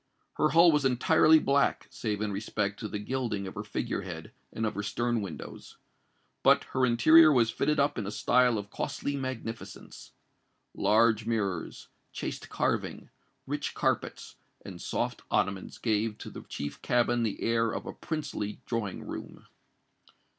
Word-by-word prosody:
Her 155 - +3
hull 170 +2 +7
was 150 -2 +2
entirely 155 +5 +5
black, 140 -2 +2
save 105 -2 -3
in 105 -1 -1
respect 100 0 -2
to 110 - -4
the 105 - -4
gilding 105 -2 -2
of 95 - -6
her 105 - -5
figurehead 95 -5 -4 0.2
and 110 - -2
of 105 - -1
her 105 - -3
stern 120 +2 -1
windows; 95 -6 -8 0.6
but - - +5
her 130 -1 +3
interior 155 +7 +7
was 120 -5 +3
fitted 150 +5 0
up 140 -2 +1
in 100 - -4
a - - -3
style 125 +1 +3
of 100 0 -6
costly 140 - -3
magnificence. 130 -4 -7 0.6
Large 110 0 +3
mirrors, 100 -7 -2 0.3
chaste - - -5
carving, - - -2 0.3
rich - - -3
carpets, - - -2 0.3
and - - -8
soft - - -2
ottomans 95 0 -1
gave 110 -1 0
to - - -9
the - - -8
chief 70 0 -5
cabin 120 0 +2
the 110 -3 -1
air 115 -1 +1
of - - -5
a - - -6
princely 150 -10 -4
drawing 115 -5 -3
room. - - -8
115 Hz, 155 wpm, -29 LUFS, 105-130 Hz, 0.6 s, hull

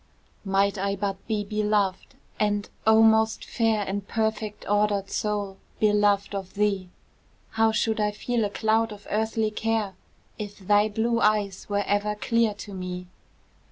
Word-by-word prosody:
Might 195 0 +1
I 200 +1 0
but 195 -1 -2
be 215 -2 0
beloved, 210 -2 0 0.2
and, 205 -1 +1 0.2
O 220 0 +7
most 220 0 +3
fair 220 -3 +1
And 200 0 -3
perfect 220 -1 -2
ordered 205 -1 +1
soul, 205 -2 -2 0.2
beloved 205 -1 +3
of 190 -2 -5
thee, 200 -3 0 0.6
How 225 0 +3
should 220 0 0
I 210 0 +2
feel 230 +2 -1
a 205 - 0
cloud 220 +2 +1
of 205 -1 -11
earthly 220 0 0
care, 220 -2 -1 0.5
If 205 -1 -6
thy 205 +2 +3
blue 230 +2 0
eyes 210 -3 +1
were 205 0 +1
ever 205 +1 0
clear 230 0 +1
to 205 0 -9
me? 180 -1 -6
210 Hz, 150 wpm, -26 LUFS, 200-220 Hz, 0.6 s, O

